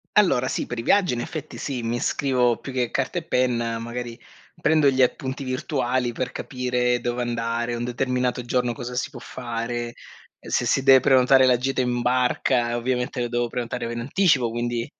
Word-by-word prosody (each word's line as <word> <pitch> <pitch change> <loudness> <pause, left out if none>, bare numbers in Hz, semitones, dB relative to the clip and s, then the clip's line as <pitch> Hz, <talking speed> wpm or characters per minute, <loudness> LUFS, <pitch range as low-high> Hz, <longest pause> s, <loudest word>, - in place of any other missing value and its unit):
Allora 135 -12 +4
sì, - - -2
per 120 - -6
i - - -2
viaggi 195 +1 +3
in 120 - -2
effetti 155 +4 -6
sì, 130 -4 -4
mi 115 +1 -1
scrivo 125 -4 +1
più 135 - -8
che 125 -2 -1
carta 135 +5 -1
e - - -12
penna, 120 -5 0
magari 120 0 -6 0.4
prendo 155 -3 +4
gli 130 -1 +1
appunti 130 +2 0
virtuali 130 -1 -1
per 125 +1 -4
capire 125 -2 -1
dove 120 +1 -2
andare 120 0 -2
un 120 0 -3
determinato 125 0 -1
giorno, 125 0 0
cosa 125 +1 -6
si 130 - -1
può 130 -4 -11
fare, 120 -1 -4 0.4
se - - -2
si 135 - +1
deve 135 -1 +8
prenotare 130 0 +5
la 125 -1 +5
gita 130 +2 -1
in 125 -1 0
barca, 125 -1 +1
ovviamente, 125 +1 -1
lo 120 - -2
devo 120 0 0
prenotare 120 0 -4
in 120 - -4
anticipo, 135 -2 +2
quindi 120 0 -2
125 Hz, 185 wpm, -24 LUFS, 120-130 Hz, 0.4 s, deve